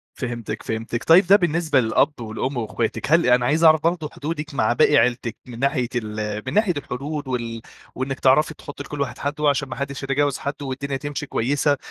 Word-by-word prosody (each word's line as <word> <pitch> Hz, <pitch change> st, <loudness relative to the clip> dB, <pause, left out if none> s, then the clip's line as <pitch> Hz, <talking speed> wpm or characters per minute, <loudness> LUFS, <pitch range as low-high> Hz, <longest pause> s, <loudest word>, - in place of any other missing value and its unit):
فهمتِك، 120 Hz, -3 st, -5 dB
فهمتِك، 115 Hz, +1 st, -3 dB
طيب 175 Hz, +3 st, +6 dB
ده 195 Hz, -, +8 dB
بالنسبة 170 Hz, -5 st, +2 dB
للأب 120 Hz, +3 st, +1 dB
والأم 115 Hz, +4 st, -3 dB
وأخواتِك، 115 Hz, +5 st, -2 dB
هل 170 Hz, +1 st, +5 dB
أنا 125 Hz, 0 st, +4 dB
عايز 155 Hz, +6 st, +2 dB
أعرف 160 Hz, -1 st, +6 dB
برضه 165 Hz, -2 st, 0 dB
حدودِك 150 Hz, 0 st, -5 dB
مع 110 Hz, -3 st, +2 dB
باقي 150 Hz, +1 st, +4 dB
عيلتِك، 120 Hz, -1 st, +1 dB
من 120 Hz, -1 st, -9 dB
ناحية 135 Hz, -3 st, +1 dB
ال 105 Hz, -2 st, -3 dB
من -, -, -3 dB
ناحية 205 Hz, -4 st, +3 dB
الحدود 145 Hz, +2 st, -5 dB
وال 115 Hz, -3 st, -3 dB, 0.3 s
وإنِك 130 Hz, +1 st, -3 dB
تعرفي 150 Hz, +4 st, +4 dB
تحطّي 145 Hz, -1 st, -9 dB
لكلّ 145 Hz, 0 st, -6 dB
واحد 135 Hz, -3 st, -3 dB
حدُّه 145 Hz, +1 st, 0 dB
عشان 140 Hz, -, -1 dB
ما -, -, -5 dB
حدش 140 Hz, 0 st, -5 dB
يتجاوز 140 Hz, 0 st, +1 dB
حدُّه 140 Hz, 0 st, -5 dB
والدنيا 135 Hz, +1 st, -3 dB
تمشي 145 Hz, +2 st, -5 dB
كويسة، 145 Hz, +3 st, +1 dB
140 Hz, 190 wpm, -22 LUFS, 120-150 Hz, 0.3 s, ده